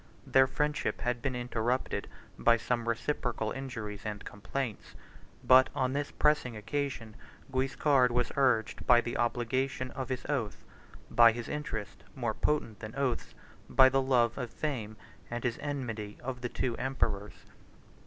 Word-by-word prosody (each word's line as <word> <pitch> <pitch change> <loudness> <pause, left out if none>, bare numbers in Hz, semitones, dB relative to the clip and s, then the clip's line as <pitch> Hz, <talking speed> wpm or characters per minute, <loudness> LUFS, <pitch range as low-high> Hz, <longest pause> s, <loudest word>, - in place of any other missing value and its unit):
Their 130 0 +5
friendship 150 +2 -1
had 120 +1 -1
been 135 -2 -1
interrupted 120 +1 -1 0.3
by 115 0 +4
some 120 0 -1
reciprocal 115 -2 -1
injuries 115 -7 -5
and 105 -2 -5
complaints; 115 +3 -5 0.5
but, 130 0 +7
on 130 0 +1
this 145 +1 -1
pressing 150 -6 +1
occasion, 115 -1 -3 0.4
Guiscard 135 0 +3
was 120 0 0
urged 125 -5 +1
by 120 -1 +8
the 120 +1 -3
obligation 130 +2 -1
of 130 0 -5
his 130 -1 -3
oath, 125 -8 -2 0.5
by 115 -1 +8
his 120 +1 -6
interest, 110 -10 -5
more 120 -4 -1
potent 115 -5 -1
than 110 +1 -8
oaths, 135 -4 -1 0.3
by 130 0 +7
the 135 +1 +2
love 125 -3 +2
of 125 - -3
fame, 115 -7 -4 0.3
and 120 0 -4
his 120 -2 -1
enmity 115 -8 -4
to 130 - -1
the 125 - -2
two 120 -1 -1
emperors. 110 -6 -2
125 Hz, 145 wpm, -31 LUFS, 115-135 Hz, 0.5 s, by